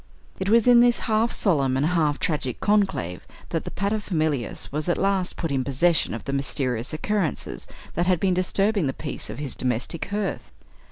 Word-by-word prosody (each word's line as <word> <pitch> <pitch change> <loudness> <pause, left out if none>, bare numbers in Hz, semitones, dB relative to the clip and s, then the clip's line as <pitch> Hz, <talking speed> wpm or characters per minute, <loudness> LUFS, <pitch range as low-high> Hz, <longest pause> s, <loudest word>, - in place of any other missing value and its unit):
It 190 +1 -1
was 230 0 +5
in 245 -1 +7
this 240 0 +4
half 225 +1 +1
solemn 140 -9 +2
and 140 - +2
half 155 -4 +2
tragic 140 -6 -2
conclave 195 - 0 0.2
that - - -2
the - - -3
pater 200 +2 -1
familias 155 - -2
was 150 +4 -2
at 175 - +2
last 195 -2 0
put 165 -4 -2
in 135 -2 +1
possession 140 0 +2
of 115 - -7
the 140 - -3
mysterious 130 -3 -2
occurrences 185 +1 -2 0.3
that 175 +2 0
had 180 -3 +3
been 190 0 +2
disturbing 195 0 +1
the 135 - -1
peace 145 - -5
of - - -6
his 145 -3 -4
domestic 125 +6 -2
hearth. 205 +1 -3
170 Hz, 185 wpm, -24 LUFS, 140-200 Hz, 0.3 s, in